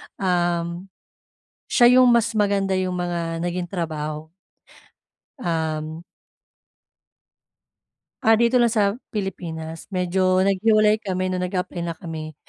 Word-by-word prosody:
Um, 175 -1 -1 0.8
siya 250 +1 +6
yung 255 - +6
mas 235 -1 +3
maganda 200 -2 +1
yung 185 -1 -1
mga 170 -1 -3
naging 175 0 -3
trabaho. 155 -3 -4 1.1
Um 160 -1 -2 2.2
Ah, 225 - +5
dito 235 +3 +3
lang 235 -1 +3
sa 205 0 +1 0.2
Pilipinas, 165 -6 -5
medyo 185 0 +2
naghiwalay 215 +2 +3
kami 185 -3 -2
nung 180 0 -2
nag-apply 180 -2 -3
na 170 - -3
kami. 160 -1 -7
180 Hz, 105 wpm, -23 LUFS, 170-205 Hz, 2.2 s, siya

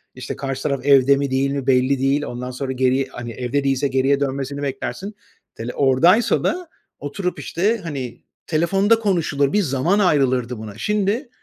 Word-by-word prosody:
işte, 130 0 -6
karşı 135 -1 -4
taraf 140 -3 -2
evde 140 -1 +6
mi 140 -1 -2
değil 135 +1 +1
mi 140 -2 -3
belli 130 +1 +3
değil, 135 +2 +1
ondan 125 -1 -5
sonra 130 +1 -4
geriye, 130 +1 +1
hani, 120 -2 -7
evde 125 +4 -2
değilse 135 +1 +1
geriye 135 +1 +2
dönmesini 140 0 -3
beklersin, 145 +9 -4 0.4
hani, 115 +2 -5
oradaysa 165 - +3
da 360 -1 -1 0.3
oturup 180 +6 -4
işte, 205 +7 0
hani, 135 -7 -6 0.2
telefonda 195 +7 +2
konuşulur 160 -9 0
bir 210 - +3
zaman 165 +5 +1
ayrılırdı 130 - +2
buna. 105 -1 -9
Şimdi 210 - -1
140 Hz, 165 wpm, -21 LUFS, 130-170 Hz, 0.4 s, evde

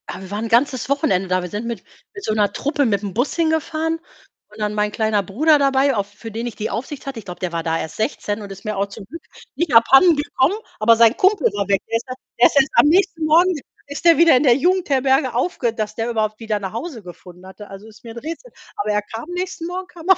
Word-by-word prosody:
Ja, - - -6
wir 190 0 -10
waren 210 +2 -3
'n - - -3
ganzes 255 +2 +1
Wochenende 280 - +1
da. 185 0 0
Wir 180 - -6
sind 210 +4 -5
mit 230 -5 -5 0.3
mit 395 -2 -10
so 215 - -1
'ner 205 -2 +1
Truppe 290 0 0
mit 200 -4 0
dem 200 -3 -5
Bus 245 +6 -1
hingefahren 320 0 -1 0.5
und 210 +1 -16
dann 210 0 -1
mein 210 0 0
kleiner 215 -2 0
Bruder 295 - +3
dabei, 275 -1 +2
auf 200 -2 -1
für 225 +2 -10
den 230 +3 -4
ich 240 - -7
die 215 - -4
Aufsicht 260 +6 -6
hatte. 265 -4 -5
Ich 210 - -13
glaube, 180 -1 -8
der 180 -2 -3
war 165 -1 -3
da 165 0 -1
erst 155 - -6
16 215 -1 -2
und 200 -1 -9
ist 195 +3 -11
mir 215 0 -2
auch 200 +1 0
zum 200 0 -11
Glück 310 +10 -10 0.3
nicht 340 -6 -1
abhanden 270 +9 +6
gekommen, 290 +3 +1 0.2
aber 230 +2 +5
sein 230 +1 +5
Kumpel 380 -4 +3
war 200 -1 -2
weg. 195 -1 +2
Der - - -3
ist 235 +3 -10
e - - -3 0.3
der 245 - +8
ist - - -6
erst 270 - +3
am - - +6
nächsten 335 -1 +2
Morgen 340 +4 +4 0.3
ist 285 +4 -8
der 335 -3 +7
wieder 335 -4 +6
in 250 - +1
der 250 -4 +5
Jugendherberge 275 -5 +1
aufge 245 -3 -1
dass 215 -2 -4
der 225 +1 -2
überhaupt 215 -2 -2
wieder 220 -2 -2
nach 190 -2 -5
Hause 235 -2 -6
gefunden 180 0 -13
hatte. 195 +2 -12
Also, 195 +2 -11
ist 215 -1 -17
mir 230 - -9
'n - - -6
Rätsel. 330 - -8 0.3
Aber 205 +1 -1
er 210 0 +1
kam 225 +8 -9
nächsten 360 -1 -4
Morgen 365 +1 -5
kam 350 -1 -13
er 380 - +7
235 Hz, 260 wpm, -20 LUFS, 210-305 Hz, 0.5 s, der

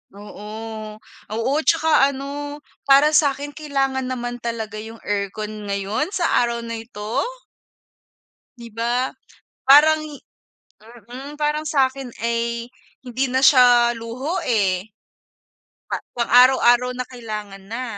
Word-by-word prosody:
Oo, 215 +1 -8 0.4
oo 230 +3 -1
at 315 - -6
saka 320 -1 +3 0.2
ano, 290 +2 -6 0.2
para 280 +2 +6
sa'kin 290 -2 +2
kailangan 270 -3 -2
naman 245 -1 -4
talaga 225 -2 -5
yung 225 +1 -10
aircon 205 +1 -4
ngayon 200 +8 -2
sa 350 -3 +2
araw 235 0 -4
na 230 -1 -5
ito. 225 -2 -4 1.4
Di 235 -2 -11
ba? 240 +3 -1 0.5
Parang 305 +3 +7 1.1
mm 275 +5 -9
parang 300 +1 0
sa'kin 270 -3 0
ay 235 0 -2 0.3
hindi 255 +1 -2
na 260 - +2
siya 245 -3 +6
luho 250 +9 -4
eh. 195 -5 +1 1.0
Pa - - -4 0.2
pang 235 - -1
araw-araw 250 0 +6
na 255 - -3
kailangan 215 -5 -8
na. 235 +4 -4
240 Hz, 115 wpm, -21 LUFS, 225-275 Hz, 1.4 s, Parang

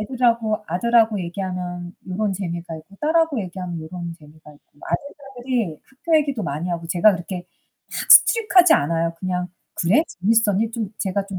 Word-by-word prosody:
애들하고 230 -2 0
아들하고 220 +3 +2
얘기하면 180 -1 -5
요런 200 +2 -1
재미가 170 -3 -5
있고, 195 +6 -17
딸하고 315 -4 +2
얘기하면 180 -2 -6
요런 170 +1 -7
재미가 150 0 -16
있고. 145 0 -26
아들딸들이 255 - -4
학교 315 +5 0
얘기도 280 -7 -2
많이 155 +3 -3
하고 170 -1 -4
제가 180 +5 +4
그렇게 175 0 -6 0.4
막 - - -5
strict 455 -2 +7
하지 355 -2 +8
않아요. 165 +3 0
그냥 180 -1 -2 0.3
"그래? 210 - +3
재밌었니?" 220 +2 +1
좀 220 -3 -4
제가 195 0 -1
좀 190 -2 -6
190 Hz, 400 characters per minute, -22 LUFS, 175-235 Hz, 0.4 s, 하지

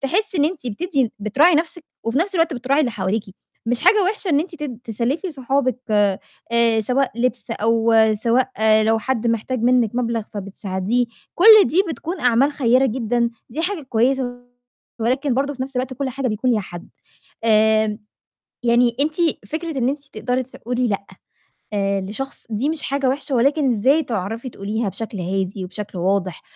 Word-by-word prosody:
تحسّي 370 +7 0
إن 290 - +4
أنتِ 310 -6 -3
بتدّي 265 - -1
بتراعي 270 - +4
نَفْسِك 330 +1 -1 0.2
وفي 230 +4 0
نَفْس 380 +4 -1
الوقت 330 -3 +2
بتراعي 265 +4 +1
اللي 255 - +1
حواليكِ، 205 0 -1 0.4
مش 245 +2 +1
حاجة 385 +4 +5
وِحشة 390 0 -1
إن 290 -2 +3
أنتِ 345 +2 -5
تد 290 -7 -6
تسلّفي 250 - -2
صحابِك 265 -2 0 0.7
آآ، 230 -1 +3
سواء 255 +5 0
لِبْس 245 -3 -1
أو 225 +1 +2 0.2
سواء 235 +4 +1 0.3
لو 225 +1 +2
حد 235 +1 -2
محتاج 230 +2 -1
منِّك 245 -3 +3
مبلغ 235 -2 -1
فبتساعديه، 200 +3 -2 0.3
كل 430 +2 +8
دي 360 +5 +2
بتكون 335 +3 -5
أعمال 250 +4 +3
خيّرة 260 -1 +3
جدًا، 235 0 0 0.2
دي 300 - -4
حاجة 365 -2 -2
كويسة 245 0 0 0.6
ولكن 260 +4 0
برضه 280 +2 0
في 260 - -4
نَفْس 265 0 -7
الوقت 255 +1 -2
كل 275 +1 -2
حاجة 265 0 -2
بيكون 225 +3 0
ليها 225 -3 +2
حد. 175 -3 -9 0.6
آآ، 220 -1 +3 0.7
يعني 235 0 +3
أنتِ 300 +2 0 0.3
فكرة 320 +3 -4
إن 245 -1 +1
أنتِ 280 +1 -3
تقدري 250 +4 -1
تقولي 245 0 -3
لأ، 200 -1 -2 0.7
آآ، 200 -1 0
لشخص، 215 +8 -6
دي 225 +7 -1
مش 315 -1 -1
حاجة 275 -1 0
وحشة 275 +1 -2
ولكن 280 +3 +2
إزاي 265 +9 +3
تعرفي 225 +3 -4
تقوليها 210 +1 -3
بشكل 215 0 -6
هادي 190 +1 -2
وبشكل 195 +1 -7
واضح، 185 -1 -1
245 Hz, 165 wpm, -21 LUFS, 220-280 Hz, 0.7 s, كل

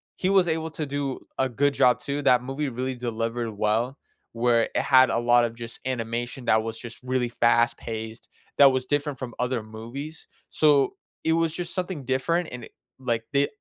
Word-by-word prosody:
he 185 - -1
was 190 -2 +4
able 160 0 -1
to 155 0 -4
do 140 -1 -3 0.2
a 130 - +2
good 145 +4 +1
job 125 -1 +4
too, 140 +2 -3
that 125 -2 +4
movie 135 +3 -3
really 130 +1 -3
delivered 115 -1 -3
well 110 +5 0 0.4
where 115 0 +3
it - - +3
had 130 -1 +6
a - - +1
lot 120 0 +4
of 115 -1 -5
just 115 0 -8
animation 120 0 -3
that 110 -2 +4
was 115 0 -5
just 120 -1 -9
really 125 -1 0
fast-paced 115 -1 0 0.3
that 140 -1 +8
was 130 -1 -1
different 145 0 -1
from 125 -3 -6
other 125 -2 -1
movies, 120 +8 -8 0.2
so 145 -4 +3 0.3
it 160 - +2
was 165 -1 +1
just 175 0 -4
something 180 -6 -3
different 160 +7 0
and 125 - -7
it - - -17 0.3
like, 120 -3 -1
they 140 0 +3
125 Hz, 190 wpm, -25 LUFS, 115-145 Hz, 0.4 s, that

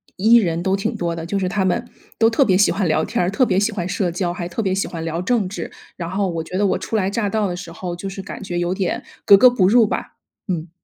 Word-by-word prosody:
E 225 +5 +5
人 170 -6 0
都 190 +1 +1
挺 195 - -2
多 170 -1 -2
的。 165 -1 -5
就 200 +4 -2
是 185 -2 -1
他 195 -1 0
们 235 +6 0 0.3
都 225 0 +4
特 250 +4 +3
别 185 -5 +3
喜 205 - +4
欢 195 0 0
聊 155 0 +1
天 - - -1
儿， 175 - +1
特 195 +7 +2
别 190 -4 +1
喜 210 +2 +1
欢 180 -4 -3
社 185 -1 -1
交， 175 0 -2
还 175 -1 -5
特 175 +6 -3
别 190 - 0
喜 195 - -1
欢 165 -2 -6
聊 165 +1 -3
政 205 -2 0
治。 200 - -6 0.3
然 170 -2 -4
后 195 +1 -1
我 165 -2 -3
觉 170 +3 -5
得 205 - +2
我 195 - +1
初 - - -5
来 195 -3 +1
乍 205 +1 -1
到 215 0 0
的 175 - -3
时 180 -2 -8
候 175 +1 -6
就 175 +3 -6
是 195 0 -6
感 190 - -8
觉 180 -3 -4
有 175 +1 0
点 190 -1 -2 0.2
格 200 - +9
格 250 +5 +7
不 195 -7 +2
入 230 +1 +5
吧， - - -4 0.3
嗯。 170 -3 -3
190 Hz, 315 characters per minute, -20 LUFS, 175-205 Hz, 0.3 s, 格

